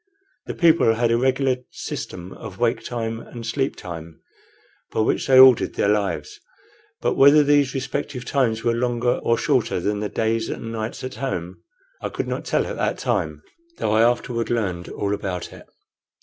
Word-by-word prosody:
The -, -, -4 dB
people 165 Hz, -9 st, +4 dB
had 115 Hz, 0 st, +1 dB
a -, -, +4 dB
regular 130 Hz, 0 st, +2 dB
system 90 Hz, +1 st, -6 dB
of 95 Hz, -, -10 dB
wake 115 Hz, -1 st, 0 dB
time 115 Hz, -2 st, -3 dB
and 115 Hz, 0 st, -9 dB
sleep 135 Hz, +4 st, -1 dB
time, 85 Hz, -2 st, -9 dB, 0.7 s
by -, -, 0 dB
which 110 Hz, -, 0 dB
they 130 Hz, -1 st, +6 dB
ordered 130 Hz, -2 st, +7 dB
their 100 Hz, -, +1 dB
lives; 100 Hz, -8 st, -1 dB, 0.6 s
but -, -, +1 dB
whether 145 Hz, +2 st, +6 dB
these 145 Hz, -2 st, +3 dB
respective 135 Hz, -1 st, -4 dB
times 115 Hz, -6 st, 0 dB
were 120 Hz, 0 st, +2 dB
longer 120 Hz, 0 st, 0 dB
or 115 Hz, -, +2 dB
shorter 125 Hz, -9 st, +1 dB
than 105 Hz, +3 st, -1 dB
the 105 Hz, 0 st, -3 dB
days 115 Hz, +1 st, -1 dB
and 115 Hz, -, -5 dB
nights 110 Hz, 0 st, -5 dB
at 130 Hz, -, -5 dB
home 90 Hz, -9 st, -4 dB, 0.4 s
I -, -, -3 dB
could -, -, -4 dB
not -, -, -4 dB
tell -, -, +1 dB
at -, -, -5 dB
that -, -, -1 dB
time, -, -, -2 dB, 0.3 s
though 105 Hz, -, -1 dB
I 110 Hz, +1 st, +4 dB
afterward 120 Hz, 0 st, +1 dB
learned 95 Hz, -7 st, -2 dB
all 100 Hz, 0 st, -2 dB
about 95 Hz, -3 st, -4 dB
it. -, -, -14 dB
115 Hz, 180 wpm, -22 LUFS, 105-130 Hz, 0.7 s, ordered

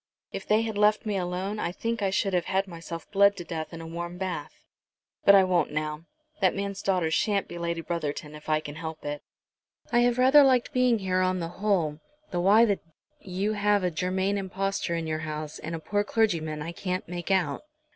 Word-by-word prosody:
If -, -, -6 dB
they 215 Hz, +1 st, +3 dB
had 220 Hz, -2 st, -3 dB
left 210 Hz, +1 st, +3 dB
me 210 Hz, -2 st, -1 dB
alone 185 Hz, +3 st, -2 dB
I 170 Hz, -, -1 dB
think 230 Hz, +4 st, -3 dB
I 195 Hz, -, +2 dB
should 195 Hz, 0 st, 0 dB
have 180 Hz, -1 st, +1 dB
had 195 Hz, +1 st, 0 dB
myself 170 Hz, -1 st, -8 dB
bled 200 Hz, 0 st, +5 dB
to -, -, -5 dB
death 160 Hz, -2 st, -5 dB
in 165 Hz, -1 st, -7 dB
a -, -, -8 dB
warm 170 Hz, +1 st, -5 dB
bath. 185 Hz, -1 st, -5 dB, 0.6 s
But 200 Hz, -, +9 dB
I 195 Hz, -, +7 dB
won't 180 Hz, -4 st, +1 dB
now. 155 Hz, +1 st, -3 dB, 0.3 s
That -, -, +3 dB
man's 200 Hz, 0 st, -3 dB
daughter 180 Hz, -4 st, +1 dB
shan't 200 Hz, +4 st, +1 dB
be 175 Hz, -, -7 dB
Lady 170 Hz, 0 st, -2 dB
Brotherton 155 Hz, -3 st, -4 dB
if 150 Hz, +1 st, -10 dB
I 155 Hz, 0 st, +2 dB
can 145 Hz, -, -7 dB
help 160 Hz, 0 st, -7 dB
it. 145 Hz, 0 st, -3 dB, 0.7 s
I 240 Hz, -, +4 dB
have 240 Hz, 0 st, +3 dB
rather 260 Hz, +3 st, +7 dB
liked 255 Hz, -3 st, +3 dB
being 250 Hz, -2 st, +3 dB
here 185 Hz, -2 st, 0 dB
on 185 Hz, 0 st, +1 dB
the 165 Hz, -1 st, -3 dB
whole, 175 Hz, -6 st, 0 dB, 0.3 s
though 175 Hz, -, 0 dB
why 210 Hz, +5 st, +6 dB
the 200 Hz, -3 st, +1 dB
d -, -, -32 dB, 0.4 s
you 195 Hz, +3 st, -2 dB
should 215 Hz, -, -3 dB
have 205 Hz, -1 st, +3 dB
a 180 Hz, -, +1 dB
Germain 190 Hz, +4 st, 0 dB
impostor 195 Hz, -2 st, -2 dB
in 165 Hz, -1 st, -2 dB
your 155 Hz, 0 st, -2 dB
house, 155 Hz, -1 st, -5 dB
and 160 Hz, +2 st, -5 dB
a -, -, -5 dB
poor 205 Hz, +5 st, 0 dB
clergyman, 165 Hz, -9 st, 0 dB
I 165 Hz, -, -5 dB
can't 185 Hz, +1 st, -3 dB
make 175 Hz, +1 st, -5 dB
out." 180 Hz, -7 st, +1 dB
185 Hz, 220 wpm, -27 LUFS, 165-200 Hz, 0.7 s, But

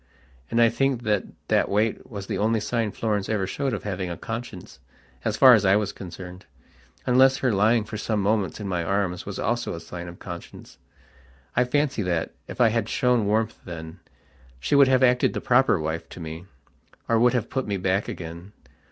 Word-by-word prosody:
And 115 Hz, -, +1 dB
I 115 Hz, -1 st, +6 dB
think 135 Hz, -1 st, 0 dB
that 105 Hz, -4 st, +1 dB, 0.2 s
that -, -, +2 dB
wait 105 Hz, +3 st, 0 dB
was 100 Hz, -4 st, -6 dB
the -, -, -3 dB
only 110 Hz, +2 st, +2 dB
sign 115 Hz, 0 st, -1 dB
Florence 105 Hz, -3 st, -2 dB
ever 105 Hz, -3 st, 0 dB
showed 135 Hz, +9 st, -2 dB
of 110 Hz, -, -4 dB
having 95 Hz, -3 st, -3 dB
a 85 Hz, -, -5 dB
conscience 115 Hz, -3 st, -7 dB, 0.4 s
as 110 Hz, -1 st, -1 dB
far 130 Hz, -2 st, +9 dB
as 110 Hz, -4 st, +4 dB
I 95 Hz, 0 st, +5 dB
was 105 Hz, -1 st, 0 dB
concerned, 90 Hz, 0 st, -10 dB, 0.6 s
unless 130 Hz, +1 st, +5 dB
her 125 Hz, -4 st, +1 dB
lying 110 Hz, +3 st, +3 dB
for 105 Hz, 0 st, -7 dB
some 110 Hz, 0 st, -1 dB
moments 100 Hz, -3 st, 0 dB
in 105 Hz, -, -5 dB
my 90 Hz, -3 st, -1 dB
arms 95 Hz, 0 st, -1 dB
was 100 Hz, -, -5 dB
also 120 Hz, -5 st, -1 dB
a -, -, -6 dB
sign 85 Hz, +1 st, -8 dB
of 85 Hz, 0 st, -9 dB
conscience. 85 Hz, -2 st, -10 dB, 0.8 s
I 125 Hz, -, +3 dB
fancy 140 Hz, -1 st, 0 dB
that, 85 Hz, -4 st, -1 dB, 0.2 s
if -, -, -9 dB
I 120 Hz, -2 st, +6 dB
had 110 Hz, -1 st, -1 dB
shown 125 Hz, -6 st, +2 dB
warmth 110 Hz, +1 st, 0 dB
then, 80 Hz, 0 st, -8 dB, 0.6 s
she 65 Hz, -, -2 dB
would 140 Hz, -1 st, +7 dB
have 130 Hz, 0 st, +3 dB
acted 125 Hz, -1 st, +3 dB
the -, -, -2 dB
proper 125 Hz, -6 st, +3 dB
wife 80 Hz, +2 st, -4 dB
to -, -, -10 dB
me, 80 Hz, +1 st, -7 dB, 0.6 s
or 115 Hz, -1 st, +3 dB
would 120 Hz, +1 st, +4 dB
have 120 Hz, -3 st, -1 dB
put 130 Hz, -1 st, -2 dB
me 100 Hz, -1 st, -1 dB
back 95 Hz, +2 st, 0 dB
again. 85 Hz, +4 st, -8 dB
105 Hz, 200 wpm, -25 LUFS, 90-120 Hz, 0.8 s, far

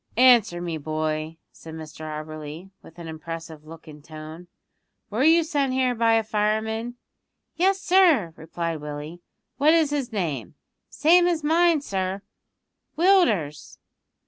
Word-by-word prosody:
"Answer 235 Hz, -8 st, +5 dB
me, 170 Hz, -2 st, -4 dB
boy," 155 Hz, +1 st, -3 dB
said 160 Hz, -1 st, -11 dB
Mr 155 Hz, -1 st, -10 dB
Auberly 155 Hz, +3 st, -8 dB
with 165 Hz, -, -17 dB
an 170 Hz, -1 st, -9 dB
impressive 160 Hz, -1 st, -8 dB
look 165 Hz, 0 st, -12 dB
and 150 Hz, -1 st, -13 dB
tone; 155 Hz, +2 st, -10 dB, 0.6 s
"were 225 Hz, +6 st, 0 dB
you 330 Hz, +2 st, +5 dB
sent 285 Hz, -5 st, -1 dB
here 255 Hz, -1 st, +1 dB
by 230 Hz, -1 st, +2 dB
a 225 Hz, -, +2 dB
fireman?" 220 Hz, +2 st, -1 dB, 0.6 s
"Yes, 385 Hz, +2 st, +2 dB
sir," 340 Hz, -, +3 dB
replied 165 Hz, 0 st, -5 dB
Willie. 150 Hz, +3 st, -7 dB, 0.4 s
"What 300 Hz, +4 st, +4 dB
is 315 Hz, -3 st, +2 dB
his 275 Hz, -4 st, -2 dB
name?" 155 Hz, -, -3 dB, 0.3 s
"Same 345 Hz, +5 st, +4 dB
as 335 Hz, -3 st, -1 dB
mine, 330 Hz, 0 st, +3 dB
sir 195 Hz, -4 st, -3 dB, 0.7 s
Willders." 240 Hz, -, +2 dB
190 Hz, 135 wpm, -24 LUFS, -, 0.7 s, Answer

